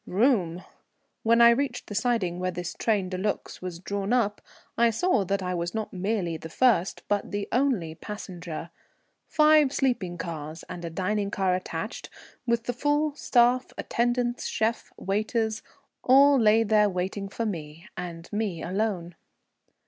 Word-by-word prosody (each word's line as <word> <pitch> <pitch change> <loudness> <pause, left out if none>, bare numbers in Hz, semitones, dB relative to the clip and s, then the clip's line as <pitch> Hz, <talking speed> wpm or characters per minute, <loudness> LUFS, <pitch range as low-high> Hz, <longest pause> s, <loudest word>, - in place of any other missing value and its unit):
Room! 185 -5 +2 0.6
When 230 +1 +4
I 235 0 +9
reached 250 0 -1
the - - -8
siding 205 -6 0
where 185 0 -1
this 175 -1 -4
train 205 -5 0
de 185 0 -4
luxe 210 +2 -3
was 180 -2 -5
drawn 200 +3 -3
up, 220 -5 +1 0.3
I 235 0 +4
saw 230 - +2
that 195 +1 -1
I 180 0 -2
was 175 +2 -3
not 220 -1 -3
merely 185 -3 -1
the 160 - -9
first 210 -3 +2
but 205 -1 0
the 205 -1 -3
only 240 - +1
passenger. 175 -3 -7 0.6
Five 305 -2 +5
sleeping 240 -12 0
cars 160 -1 -6
and 175 -1 -7
a 170 - -3
dining 200 +4 -1
car 190 -2 +1
attached, 185 0 -4 0.4
with 235 -1 +1
the 245 - -2
full 290 +4 +1
staff, 245 -2 +2
attendants, 240 0 0
chef, 225 +2 -1
waiters 220 +2 -1 0.4
all 275 +2 +6
lay 220 0 +5
there 210 -1 +4
waiting 190 +2 -3
for 230 +3 -3
me, 165 -2 -6
and 170 -1 -6
me 205 -6 -2
alone. 185 -2 -2
205 Hz, 155 wpm, -27 LUFS, 180-235 Hz, 0.6 s, I